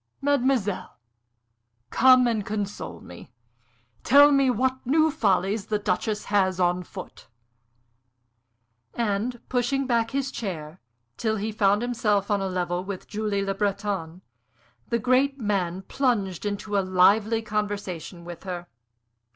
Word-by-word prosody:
Mademoiselle, 265 -8 0 0.9
come 255 0 +6
and 225 -3 0
console 200 - -5
me. 90 - -12 0.7
Tell 285 +3 +7
me 275 -2 +4
what 260 +2 0
new 310 +5 +3
follies 195 -3 0
the 215 - 0
Duchess 205 +2 -2
has 190 -3 +1
on 180 0 +2
foot." 185 +1 -10 1.7
And, 230 +2 -1
pushing 260 +2 0 0.2
his 270 0 -2
chair 170 -9 -5
back 165 +4 -19 0.4
till 220 -1 0
he 215 +1 -3
found 205 0 +2
himself 210 -4 0
on 200 -1 +1
a 195 - -1
level 180 -1 -2
with 190 -1 -7
Julie 210 -2 -2
Le 195 - -1
Breton, 195 -3 -3 0.6
the 235 - +1
great 255 +4 +2
man 190 -4 -1
plunged 205 - -1
into 205 +1 -4
a - - +2
lively 200 +4 +3
conversation 205 -5 -4
with 175 -1 -8
her. 180 -2 -6
205 Hz, 125 wpm, -25 LUFS, 190-240 Hz, 1.7 s, Tell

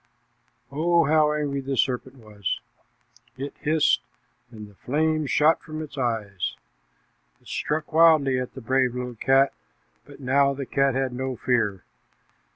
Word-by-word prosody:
Oh, 170 +3 +2
how 155 +1 +3
angry 145 -2 -2
the 135 0 -3
serpent 130 +1 -1
was! 105 -5 -4 0.8
It 140 +2 -5
hissed, 155 0 +2 0.5
and 110 -3 -10
the 105 - -18
flames 155 +6 -1
shot 150 +6 +3
from 155 -1 -7
its 155 -2 -7
eyes. 110 - -2 0.8
It - - -22
struck 155 +1 -3
wildly 155 -5 +5
at 125 - -6
the 130 - -8
brave 130 +1 +1
little 125 0 -4
cat, 135 +4 +3 0.5
but - - -14
now 140 +1 +2
the 140 0 -5
cat 135 0 +1
had 135 -1 -1
no 130 +1 -3
fear. 105 -6 0
135 Hz, 145 wpm, -25 LUFS, 125-150 Hz, 0.8 s, wildly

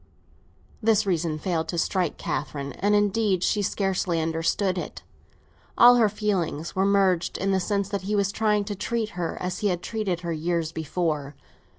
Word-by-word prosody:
This 215 -1 +3
reason 170 -4 0
failed 160 0 -2
to 170 - -3
strike 180 +2 0
Catherine; 140 -1 -4
and 205 +2 +1
indeed 205 -2 +2
she 210 - +1
scarcely 190 -4 0
understood 165 +4 0
it. - - -7 0.7
All 245 +1 +8
her 225 -3 +4
feelings 190 -7 -2
were 190 +1 +2
merged 190 -3 +2
in 195 +1 0
the 190 - +2
sense 200 +1 -1
that 200 -1 -2
he 205 +3 -2
was 200 -1 +1
trying 210 -1 +1
to 205 +1 -4
treat 225 +2 -2
her 175 -3 -4
as 180 0 -3
he 210 - +1
had 175 -2 -1
treated 200 -6 -2
her 170 -1 -3
years 165 0 -1
before. 155 -3 -2
185 Hz, 175 wpm, -25 LUFS, 165-205 Hz, 0.7 s, All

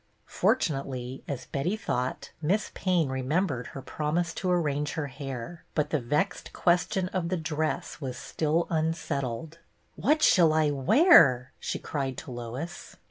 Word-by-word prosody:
Fortu 250 -10 +2
nately, 130 -2 -5
as 140 -3 -4
Betty 155 +9 -1
thought. 125 -12 -3
Miss 190 +7 0
Payne 180 -6 +1
remem 130 +8 +1
bered 125 -8 -4
her 135 - -8
promise 160 +4 -1
to 185 - -2
arrange 150 -4 0
her 160 - -2
hair; 135 +3 -7
but 150 -1 0
the 155 - +2
vexed 150 +10 -1
question 180 +2 +2
of 180 -3 -2
the 185 - 0
dress 155 -1 -2
was 130 -3 -4
still 160 +2 0
unsettled. 160 -2 -2 0.4
"What 305 +7 +2
shall 165 -4 +6
I 155 -1 +3
wear.'*" 140 - +6
she - - -3
cried 135 -3 -3
to 145 - -7
Lois. 120 +7 -6
155 Hz, 150 wpm, -28 LUFS, 135-175 Hz, 0.4 s, shall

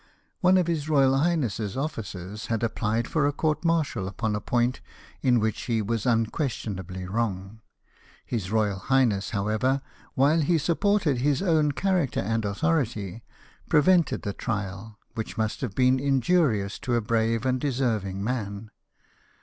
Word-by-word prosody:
One 185 +1 +5
of 180 - +3
his 160 -3 -2
royal 135 -3 +4
highness's 125 - 0
oflicers 105 - -5
had 115 -2 -1
apphed 115 0 0
for 150 +1 +1
a - - +2
court 155 +2 -1
martial 160 - 0
upon 105 +2 -2
a 105 - -3
point 120 +3 0 0.4
in 125 -3 +3
which 110 0 -1
he 115 -2 0
was 110 +2 -1
unquestionably 110 - -1
wrong. 100 0 -3 0.6
His 105 -6 -3
royal 105 -3 +1
highness, 115 -3 +2
how 100 -1 -2
ever, 130 +6 +1 0.3
while 145 +5 +4
he 170 +3 +2
supported 170 -2 +1
his 145 +6 +1
own 155 -5 +2
character 180 -6 0
and 115 +3 -1
au 100 - -2
thority, 120 - -1 0.5
prevented 165 +2 +3
the 100 - -3
trial, 105 -1 -4 0.2
which 110 - -5
must 110 -1 -1
have 120 -7 -4
been 130 0 +3
injurious 135 - +1
to 120 - -1
a - - +3
brave 115 +1 0
and 130 -1 +1
deserving 110 -8 -1
man. 105 -3 -4
120 Hz, 150 wpm, -26 LUFS, 105-145 Hz, 0.6 s, One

